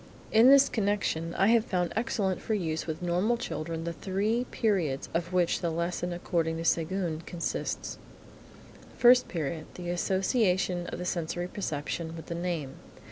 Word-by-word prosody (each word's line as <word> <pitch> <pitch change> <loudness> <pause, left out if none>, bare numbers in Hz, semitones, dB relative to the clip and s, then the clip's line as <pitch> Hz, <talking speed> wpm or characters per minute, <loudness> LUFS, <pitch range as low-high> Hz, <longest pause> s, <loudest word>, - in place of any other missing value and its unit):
In 225 +3 +7
this 275 0 +8
connection 200 -6 -1
I 195 - +3
have 230 -1 +5
found 180 -5 -1
excellent 200 -4 0
for 220 - -1
use 160 -5 -2
with 160 +2 -4
normal 180 +7 +1
children 165 -6 -4
the 170 0 -3
three 210 +7 -1
periods 175 -11 0
of 170 +1 -1
which 180 -2 +2
the 170 - 0
lesson 170 +2 -2
according 165 -2 -1
to 165 - -4
Séguin 165 0 0
consists: 170 -1 -3 1.0
First 250 +1 +6
Period. 155 -2 -3
The 175 -1 -4
association 185 -1 +1
of - - -5
the 180 - -5
sensory 175 0 -2
perception 165 -2 -4
with 165 - -8
the - - -5
name. 170 -5 -3
175 Hz, 155 wpm, -29 LUFS, 165-200 Hz, 1.0 s, this